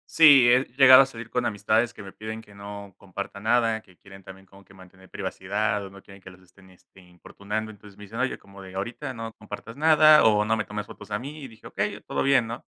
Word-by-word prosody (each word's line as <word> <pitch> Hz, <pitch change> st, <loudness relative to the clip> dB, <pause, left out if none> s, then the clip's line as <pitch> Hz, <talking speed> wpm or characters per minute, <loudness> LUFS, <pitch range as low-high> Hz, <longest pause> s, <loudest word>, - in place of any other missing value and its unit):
Sí, 145 Hz, -6 st, +8 dB
he 125 Hz, +2 st, +4 dB
llegado 130 Hz, -1 st, +9 dB
a 135 Hz, -, +3 dB
salir 115 Hz, -3 st, -11 dB
con 125 Hz, -1 st, -1 dB
amistades 110 Hz, +3 st, 0 dB
que -, -, -12 dB
me 95 Hz, -, -10 dB
piden 110 Hz, +1 st, -7 dB
que 105 Hz, -, -19 dB
no 100 Hz, -1 st, -10 dB
comparta 100 Hz, +1 st, -8 dB
nada, 115 Hz, 0 st, +1 dB
que 95 Hz, -4 st, -24 dB
quieren 95 Hz, -1 st, -15 dB
también 95 Hz, +1 st, -13 dB
como 100 Hz, +1 st, -19 dB
que 95 Hz, -, -20 dB
mantener 95 Hz, 0 st, -18 dB
privacidad, 100 Hz, +1 st, -3 dB
o 95 Hz, -, -9 dB
no 100 Hz, 0 st, -15 dB
quieren 100 Hz, -1 st, -16 dB
que 95 Hz, -, -12 dB
los 90 Hz, -, -17 dB
estén, 95 Hz, +1 st, -22 dB
este, 95 Hz, +1 st, -22 dB
importunando. 100 Hz, +4 st, -7 dB
Entonces, 105 Hz, -1 st, -17 dB
me 105 Hz, -, -12 dB
dicen: 110 Hz, +4 st, -9 dB
"Oye". 130 Hz, -, -1 dB
Como 100 Hz, 0 st, -16 dB
de: 95 Hz, 0 st, -12 dB
"Ahorita 115 Hz, +8 st, -5 dB
no 115 Hz, -1 st, -7 dB
compartas 110 Hz, +2 st, -10 dB
nada, 155 Hz, 0 st, +6 dB
o 105 Hz, -1 st, +3 dB
no 110 Hz, +1 st, +1 dB
me 110 Hz, -, -3 dB
tomes 105 Hz, 0 st, -6 dB
fotos 105 Hz, 0 st, -13 dB
a 105 Hz, -, -2 dB
mí", 145 Hz, +6 st, -9 dB
y -, -, -7 dB
dije: 110 Hz, -2 st, -18 dB
"Okey, -, -, -3 dB
todo -, -, -4 dB
bien", 135 Hz, -4 st, +3 dB
¿no?, 115 Hz, +2 st, -7 dB
105 Hz, 245 wpm, -25 LUFS, 95-115 Hz, -, llegado